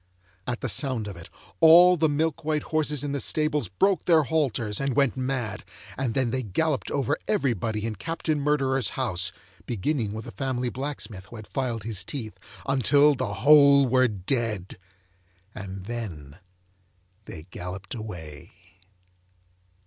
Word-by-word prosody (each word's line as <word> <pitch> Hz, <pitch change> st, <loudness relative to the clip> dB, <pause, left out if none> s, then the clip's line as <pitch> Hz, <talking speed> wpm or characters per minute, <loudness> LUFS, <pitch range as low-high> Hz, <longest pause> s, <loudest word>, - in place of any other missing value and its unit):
At 120 Hz, -1 st, -3 dB
the -, -, -2 dB
sound 130 Hz, -7 st, 0 dB
of 100 Hz, -, -7 dB
it, 85 Hz, -1 st, -12 dB, 0.3 s
all 175 Hz, +3 st, +8 dB
the 160 Hz, -2 st, +2 dB
milk 160 Hz, +2 st, -1 dB
white 155 Hz, -1 st, 0 dB
horses 150 Hz, -3 st, -1 dB
in 145 Hz, -, -3 dB
the 140 Hz, -, -2 dB
stables 150 Hz, -4 st, 0 dB
broke 190 Hz, -, +1 dB
their 165 Hz, -3 st, +5 dB
halters 130 Hz, -9 st, 0 dB
and 135 Hz, -2 st, -1 dB
went 140 Hz, -3 st, +2 dB
mad, 130 Hz, -6 st, -3 dB, 0.3 s
and 130 Hz, -4 st, -2 dB
then 130 Hz, -3 st, +1 dB
they 130 Hz, +1 st, -1 dB
galloped 135 Hz, -, -1 dB
over 140 Hz, +1 st, 0 dB
everybody 115 Hz, -, -1 dB
in 115 Hz, -, -2 dB
Captain 165 Hz, -2 st, -2 dB
Murderer's 135 Hz, -5 st, +1 dB
house 95 Hz, -8 st, +1 dB, 0.4 s
(beginning 115 Hz, 0 st, -1 dB
with 110 Hz, +1 st, -6 dB
the -, -, -8 dB
family 125 Hz, +3 st, -2 dB
blacksmith 125 Hz, -8 st, -5 dB
who 120 Hz, -, -12 dB
had 110 Hz, -2 st, -9 dB
filed 120 Hz, -4 st, -3 dB
his 105 Hz, -4 st, -3 dB
teeth) 110 Hz, 0 st, -6 dB, 0.3 s
until 140 Hz, +2 st, +4 dB
the 125 Hz, -6 st, -3 dB
whole 140 Hz, -2 st, +7 dB
were 130 Hz, +1 st, +4 dB
dead, 105 Hz, -2 st, -3 dB, 0.7 s
and 95 Hz, -2 st, -7 dB
then 90 Hz, -10 st, -7 dB, 0.9 s
they 80 Hz, -, -9 dB
galloped 90 Hz, +1 st, -7 dB
away. 85 Hz, -, -8 dB
130 Hz, 150 wpm, -26 LUFS, 105-145 Hz, 0.9 s, all